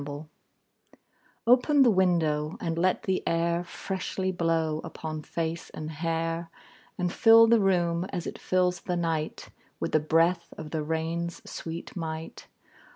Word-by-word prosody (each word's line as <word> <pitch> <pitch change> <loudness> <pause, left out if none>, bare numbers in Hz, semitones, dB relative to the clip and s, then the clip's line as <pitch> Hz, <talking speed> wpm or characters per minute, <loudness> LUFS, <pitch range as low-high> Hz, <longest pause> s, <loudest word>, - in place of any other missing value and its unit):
Nelson] 145 +2 -7 1.2
OPEN 265 +4 +5
the 240 - +5
window, 165 -5 +1
and 165 -1 -2
let 185 +3 +1
the 190 -1 0
air 170 +1 +1
Freshly 190 +1 -3
blow 165 -3 0
upon 155 -1 -6
face 165 +2 -4
and 155 0 -6
hair, 165 +1 -2 0.5
And 180 0 -1
fill 225 -1 +7
the 230 0 +5
room, 175 -3 +2
as 180 -3 -5
it - - -6
fills 180 -1 +1
the 180 -1 -2
night, 165 -2 -2 0.3
With - - -2
the 155 - +4
breath 165 +3 +1
of 155 -1 -8
the 160 - -1
rain's 165 +2 -3
sweet 165 +1 -7
might. 160 -2 -6
170 Hz, 145 wpm, -28 LUFS, 160-180 Hz, 1.2 s, fill